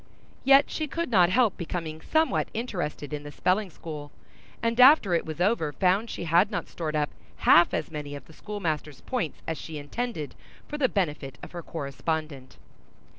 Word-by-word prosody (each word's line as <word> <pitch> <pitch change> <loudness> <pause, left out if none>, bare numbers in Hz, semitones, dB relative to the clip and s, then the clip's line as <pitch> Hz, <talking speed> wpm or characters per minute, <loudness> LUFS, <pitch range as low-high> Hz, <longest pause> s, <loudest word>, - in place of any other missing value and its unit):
Yet 275 +1 +6
she 310 - -2
could 335 -1 -3
not 180 -5 +5
help 225 0 +3
becoming 160 -2 -5
somewhat 320 0 +1
interested 175 - -3
in 150 - -3
the 145 0 -9
spelling 190 +6 +1
school, 150 -3 -8 0.5
and 230 +1 0
after 250 - +7
it 170 - +1
was 155 +1 -6
over 180 -5 +2
found 190 - +2
she - - -5
had 170 +4 +4
not 210 - -3
stored 155 -3 -4
up 150 -1 0 0.3
half 170 +1 +7
as - - -2
many 145 -2 -5
of 140 - -9
the 160 - -16
schoolmaster's 155 -8 -4
points 245 - -3
as 160 - -3
she 160 -1 -7
intended, 155 - -4 0.3
for 295 - -5
the 260 -3 +3
benefit 150 -8 -2
of - - -8
her 175 - -6
correspondent. 140 -2 -4
170 Hz, 180 wpm, -27 LUFS, 150-215 Hz, 0.5 s, after